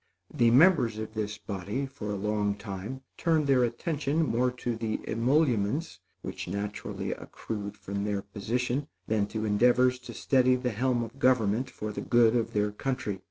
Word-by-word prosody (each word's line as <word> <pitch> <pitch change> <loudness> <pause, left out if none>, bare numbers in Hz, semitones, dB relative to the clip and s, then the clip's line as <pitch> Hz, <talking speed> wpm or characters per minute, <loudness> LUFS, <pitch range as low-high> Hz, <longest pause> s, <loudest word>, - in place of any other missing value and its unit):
The 120 - +4
members 125 - +5
of 110 0 -5
this 105 -1 -3
body, 100 +6 -4
for 130 -6 -7
a 105 - -1
long 105 0 0
time, 105 +5 -6 0.2
turned 160 -3 +2
their 135 -3 +4
attention 145 +5 0
more 125 -1 +2
to 120 -1 -3
the 110 -1 -2
emoluments 130 +3 +1 0.2
which - - -5
naturally 100 +3 -4
accrued 105 -2 -6
from 100 0 -4
their 100 -1 -1
position, 120 +7 -2 0.2
than 105 -2 +1
to 110 +1 -3
endeavors 125 +4 +4
to 125 - -10
steady 130 -1 +3
the 125 -1 -1
helm 120 +2 +1
of 115 +4 -9
government 125 -1 +2
for 105 -3 -5
the - - -5
good 120 -1 +4
of 115 -2 0
their 105 0 +1
country. 115 -3 -3
115 Hz, 165 wpm, -29 LUFS, 105-130 Hz, 0.2 s, members